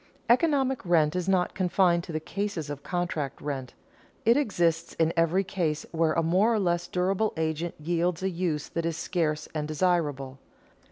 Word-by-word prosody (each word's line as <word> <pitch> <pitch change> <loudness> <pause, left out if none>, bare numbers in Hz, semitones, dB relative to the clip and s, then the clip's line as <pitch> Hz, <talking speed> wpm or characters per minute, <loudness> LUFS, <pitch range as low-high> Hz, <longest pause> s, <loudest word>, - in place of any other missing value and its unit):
Economic 265 -1 +2
rent 165 -4 +3
is 180 +1 -1
not 185 -2 +2
confined 180 -2 +2
to 170 - -8
the 155 - -1
cases 180 -3 -4
of 145 -1 -6
contract 165 -5 -3
rent. 135 -4 -5 0.5
It 230 +2 +6
exists 175 - +1
in 165 0 +2
every 165 +3 +2
case 165 -5 -2
where 165 -1 +1
a 165 - +1
more 185 +8 +3
or - - +1
less 175 -2 0
durable 190 +5 0
agent 160 +1 -2
yields 170 +2 -1
a 190 - +1
use 165 -4 -2
that 165 0 -2
is 165 -1 -2
scarce 155 -5 -1
and 150 -1 -2
desirable. 150 -5 0
170 Hz, 170 wpm, -27 LUFS, 155-185 Hz, 0.5 s, It